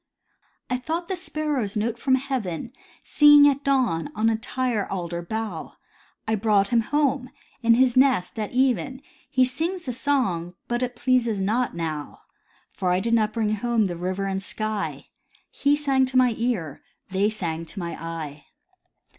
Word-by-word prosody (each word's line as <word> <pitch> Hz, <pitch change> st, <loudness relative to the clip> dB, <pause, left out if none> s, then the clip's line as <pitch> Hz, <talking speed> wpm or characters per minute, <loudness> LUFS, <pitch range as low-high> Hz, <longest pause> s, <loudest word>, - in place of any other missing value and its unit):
" -, -, -43 dB
I 250 Hz, -, +2 dB
thought 325 Hz, +7 st, -3 dB
the 380 Hz, -, 0 dB
sparrow's 300 Hz, -, -2 dB
note 230 Hz, +2 st, -1 dB
from 260 Hz, +2 st, +3 dB
heaven, 255 Hz, -, -3 dB, 0.3 s
Singing 295 Hz, -1 st, +7 dB
at 280 Hz, +1 st, -5 dB
dawn 255 Hz, -, +1 dB
on 225 Hz, +1 st, +2 dB
tire 245 Hz, -3 st, -1 dB
alder 175 Hz, -2 st, -3 dB
bough; 210 Hz, -2 st, -5 dB, 0.5 s
I 220 Hz, -, +1 dB
brought 205 Hz, -2 st, +2 dB
him 235 Hz, -1 st, +3 dB
home, 275 Hz, 0 st, 0 dB, 0.3 s
in 230 Hz, -1 st, +5 dB
his 255 Hz, 0 st, +3 dB
nest, 255 Hz, -7 st, +3 dB
at 210 Hz, -, -3 dB
even. 260 Hz, -, 0 dB, 0.3 s
He 255 Hz, -2 st, +4 dB
sings 330 Hz, +8 st, -1 dB
the 250 Hz, -, -3 dB
song, 210 Hz, -, -1 dB
but 240 Hz, +1 st, -1 dB
it 250 Hz, -1 st, -2 dB
pleases 235 Hz, -4 st, +1 dB
not 220 Hz, +5 st, 0 dB
now, 155 Hz, -3 st, -5 dB, 0.5 s
For 180 Hz, -1 st, -1 dB
I 180 Hz, -, +2 dB
did 230 Hz, +4 st, -1 dB
not 215 Hz, -2 st, +3 dB
bring 215 Hz, -1 st, 0 dB
home 225 Hz, 0 st, +1 dB
the 175 Hz, -2 st, -3 dB
river 185 Hz, +3 st, -2 dB
and 195 Hz, 0 st, -2 dB
sky. 215 Hz, +1 st, -4 dB, 0.4 s
He 285 Hz, +1 st, +2 dB
sang 270 Hz, -3 st, +2 dB
to 260 Hz, 0 st, 0 dB
my 250 Hz, -2 st, +4 dB
ear— 215 Hz, -, -2 dB, 0.3 s
they 195 Hz, +2 st, +2 dB
sang 165 Hz, -6 st, -4 dB
to 185 Hz, -, -13 dB
my 170 Hz, -2 st, -4 dB
eye." 155 Hz, -3 st, -6 dB
230 Hz, 165 wpm, -24 LUFS, 190-260 Hz, 0.5 s, Singing